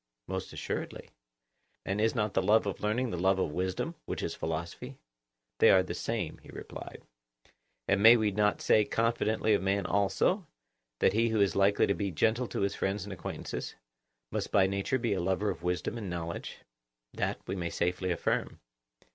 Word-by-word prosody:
Most - - -4
assuredly. - - -5 0.7
And 100 +2 -1
is 110 +2 +2
not 105 -3 0
the - - +2
love 105 +4 +4
of 100 - -4
learning 115 +4 0
the 90 - -3
love 95 +2 +3
of 95 - 0
wisdom, 95 - -2
which - - -3
is - - -2
philosophy? 80 +1 -5 0.6
They - - +7
are 95 -1 +6
the 90 - -5
same, - - -3
he - - -17
replied. - - -9 0.8
And 100 0 +2
may 115 +3 +9
we 110 -2 +1
not 105 +1 +1
say 110 - +5
confidently 110 -1 +1
of 100 - +2
man 95 0 0
also, 100 - +1 0.5
that 95 - +4
he 115 +2 +2
who 110 -1 +1
is 100 -4 +3
likely 100 +1 +4
to 100 - +1
be 100 0 -2
gentle 110 +8 +1
to - - -3
his 100 0 +1
friends 95 0 -2
and 100 0 -6
acquaintances, 90 - -5 0.6
must - - -3
by 100 -2 +5
nature 100 +7 0
be 115 -4 0
a 95 - -1
lover 95 +3 0
of 85 -3 -8
wisdom 90 +6 -2
and 100 -4 -5
knowledge? 85 -1 -5 0.6
That - - -2
we - - -3
may 85 -2 -2
safely 90 +2 -1
affirm. 85 - -1
100 Hz, 185 wpm, -30 LUFS, 95-110 Hz, 0.8 s, may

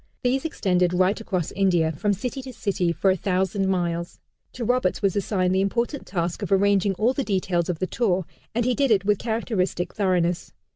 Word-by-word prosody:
These 265 +4 +1
extended 180 - +1
right 185 +4 +2
across 185 -7 -2
India, 175 -5 +2
from 185 +7 -1
city 250 +7 -3
to 260 -1 -9
city, 190 -6 0
for 180 +4 +2
a - - +2
thousand 190 +1 0
miles. 175 -2 -2 0.3
To 240 - -4
Roberts 245 -6 +1
was 195 -2 +2
assigned 185 -2 0
the 190 - +2
important 235 +8 -1
task 170 -2 -2
of - - -4
arranging 195 0 +3
all 225 +7 +2
the 275 - -1
details 185 -5 0
of 175 - -1
the 185 - -1
tour, 190 -4 0 0.3
and 235 0 +1
he 250 - +2
did 275 +1 +1
it 200 -3 +3
with 205 -1 +2
characteristic 200 -6 -1
thoroughness. 180 -4 0
195 Hz, 195 wpm, -24 LUFS, 180-220 Hz, 0.3 s, arranging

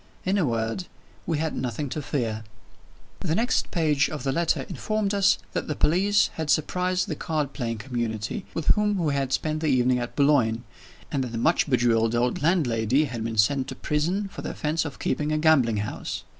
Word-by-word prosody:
In 195 +2 +2
a 165 - +2
word, 115 +9 -2 0.4
we 165 -2 0
had 160 +1 -2
nothing 125 +3 -3
to 150 - -3
fear. 115 -6 -2 0.8
The 160 - -1
next 235 +3 +1
page 155 -4 +2
of 150 -5 -5
the 135 - 0
letter 170 +4 +1
informed 215 -2 -1
us 200 -1 +4 0.2
that - - -2
the 150 - -2
police 200 +5 +3
had 160 -2 -4
surprised 180 +5 +1
the - - -2
card 150 -3 -2
playing 115 -4 -3
community 115 - -3
with 165 - -1
whom 210 -1 +3
we 160 -5 0
had 135 -2 -1
spent 155 +4 0
the 155 - -1
evening 125 -2 +3
at 120 0 -5
Boulogne, 130 -6 +3 0.5
and 135 -2 0
that 120 -2 -6
the - - -2
much 160 +6 +2
bejeweled 115 -3 +2
old 120 +3 0
landlady 140 - +2
had 120 -5 -5
been 115 0 -3
sent 130 +5 +3
to 135 - -6
prison 170 +10 -1
for - - -8
the - - -4
offense 155 +1 -1
of 145 -4 -6
keeping 150 +3 -1
a 155 - +1
gambling 145 -8 +4
house. 105 +1 -4
145 Hz, 200 wpm, -25 LUFS, 120-165 Hz, 0.8 s, us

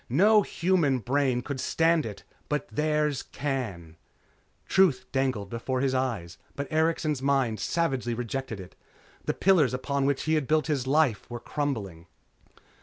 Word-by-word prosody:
No 205 - +5
human 170 -8 +1
brain 125 +1 0
could 140 -1 -4
stand 165 0 +2
it 105 -2 -8 0.3
but 150 +6 -1
theirs 150 -2 0
can." 105 - -4 0.7
Truth 185 -9 +3
dangled 130 -7 -1
before 125 +2 -2
his 135 0 +1
eyes, 115 -11 -2 0.2
but 140 - -3
Erikson's 155 -3 +1
mind 135 -6 +1
savagely 135 -6 -1
rejected 120 -1 -4
it. 90 -1 -11 0.5
The - - -1
pillars 170 -9 +3
upon 140 +2 -1
which 140 -1 0
he 160 - 0
had 155 -4 +1
built 155 0 +2
his 140 -5 -1
life 140 -6 +2
were 120 0 -5
crumbling.... 110 - -4
135 Hz, 145 wpm, -27 LUFS, 120-155 Hz, 0.7 s, No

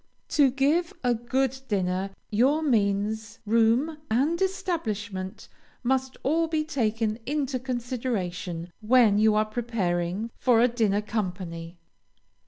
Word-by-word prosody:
To 285 -3 +4
give 290 +7 +1
a 245 -1 +3
good 260 +3 -1
dinner, 190 -1 0 0.2
your 270 +9 +3
means, 215 -3 0
room, 230 +8 +2
and 290 +10 +1
establishment 210 - -3 0.4
must 265 +1 0
all 325 +4 +2
be 315 -1 0
taken 225 -7 -1
into 275 -2 -1
consideration 225 -9 -3
when 220 -2 +5
you 215 0 +4
are 215 0 +3
preparing 215 -3 -2
for 245 -3 +4
a 240 - +6
dinner 215 -4 +1
company. 180 -5 -4
230 Hz, 115 wpm, -26 LUFS, 205-265 Hz, 0.4 s, a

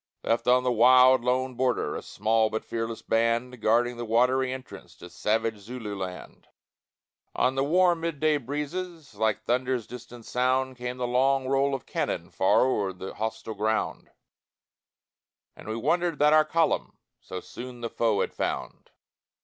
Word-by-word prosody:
Left 115 +2 0
on 125 +1 +5
the 125 - +1
wild, 125 +2 +6
lone 130 +1 0
border, 125 -10 0
A - - -4
small 110 +1 +1
but 110 +1 -4
fearless 115 0 -4
band, 115 +2 0
Guarding 120 +3 +2
the 120 - -4
watery 125 +3 +2
entrance 130 0 -9
To 90 - -12
savage 110 0 -1
Zululand; 100 -5 -7 0.9
On 130 - +2
the 135 0 0
warm 175 +2 +3
mid 165 -3 -3
day 155 0 +3
breezes, 150 +3 -5
Like 110 0 0
thunder's 125 0 0
distant 120 -1 -11
sound, 130 +1 0
Came 125 0 -5
the 125 - -2
long 130 +2 +2
roll 135 +1 +2
of 135 - -7
cannon 85 - -3
Far 95 - +3
o'er 100 -7 0
the 95 +1 -8
hostile 110 0 -4
ground, 110 +1 -2 1.5
And - - -13
we 110 - -3
wondered 165 +6 0
that 150 +1 +4
our 155 0 +6
column 165 +1 0 0.2
So 95 - -7
soon 125 +4 -9
the 115 - -3
foe 110 -4 +1
had - - -2
found. - - -4
125 Hz, 155 wpm, -27 LUFS, 110-130 Hz, 1.5 s, wild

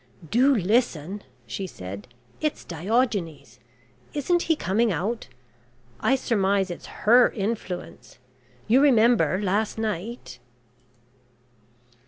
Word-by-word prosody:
"Do 265 +4 +4
listen," 200 - 0 0.2
she 125 +12 -5
said, 100 - -8 0.3
"it's 305 -1 -2
Diogenes. 190 - -2 0.6
Isn't 345 +5 +1
he 325 - +1
coming 225 -2 +1
out? 200 +8 -2 0.7
I 265 - +3
surmise 200 -6 +1
it's 175 - -8 0.2
her 240 +3 +7
influence. 195 - -5 0.5
You 245 +5 +5
remember 235 -7 +4
last 205 +2 0
night?" 220 - -4
210 Hz, 95 wpm, -25 LUFS, 185-240 Hz, 0.7 s, her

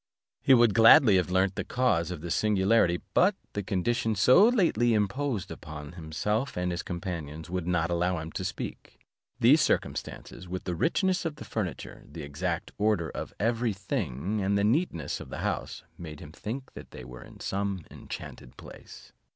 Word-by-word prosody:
He 135 - +6
would 120 -3 +5
gladly 115 -1 +7
have 90 -1 0
learnt 95 +1 +2
the - - -3
cause 120 -10 +1
of 90 -4 -6
this 85 0 -2
singularity; 100 -3 +2
but 195 +2 +4 0.2
the 105 - -2
conditions 105 +2 -1
so 155 - +7
lately 165 - +3
imposed 105 0 -1
upon 75 -1 -8
himself 90 - -2
and 90 0 -1
his 85 - -2
companions 85 -3 -6
would 90 -2 -2
not 85 -1 +1
allow 90 +1 +1
him 80 0 -6
to - - -4
speak. - - -6 0.4
These - - +6
circumstances, 90 - -2
with 95 0 -4
the 90 - -3
richness 185 - +1
of 165 -3 -3
the 150 - -10
furniture, 100 -6 -5
the 80 - -7
exact 85 +4 -3
order 105 -7 +1
of - - -6
every 115 +1 +1
thing, 100 - -3
and 100 +1 +1
the 100 - +1
neatness 115 - 0
of - - -9
the - - -6
house, - - -3 0.2
made 80 -4 -8
him 75 -3 -10
think 125 +10 -6
they 65 - -10
were 60 0 -10
in - - -15
some 100 -3 -3
enchanted - - -9
place. - - -13
95 Hz, 175 wpm, -28 LUFS, 85-115 Hz, 0.4 s, gladly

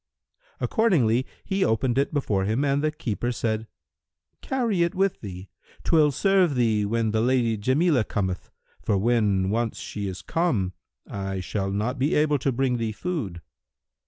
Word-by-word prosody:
Accordingly 130 - +2 0.2
he 195 0 0
opened 120 - +1
it 140 - +1
before 105 -10 0
him 115 +8 +1
and 140 +1 +1
the 155 - +3
keeper 120 -4 -3
said, 110 -2 -2 0.7
"Carry 235 -9 0
it 170 +3 +1
with 195 0 +1
thee; 95 -2 -8 0.4
'twill 155 -3 +4
serve 185 +1 +3
thee 110 -4 +2
when 115 0 0
the 110 0 +1
Lady 120 -2 +2
Jamilah 130 - +2
cometh; 95 -4 -2 0.3
for 100 - +1
when 100 -3 +2
once 115 0 -1
she 100 -1 -5
is 95 -1 -6
come, 120 - 0 0.3
I 95 -1 -4
shall 95 +1 -2
not 110 +7 -2
be 140 +4 +2
able 150 -1 +3
to 135 - 0
bring 125 0 0
thee 115 -2 -2
food." 110 - -4
120 Hz, 160 wpm, -25 LUFS, 105-150 Hz, 0.7 s, twill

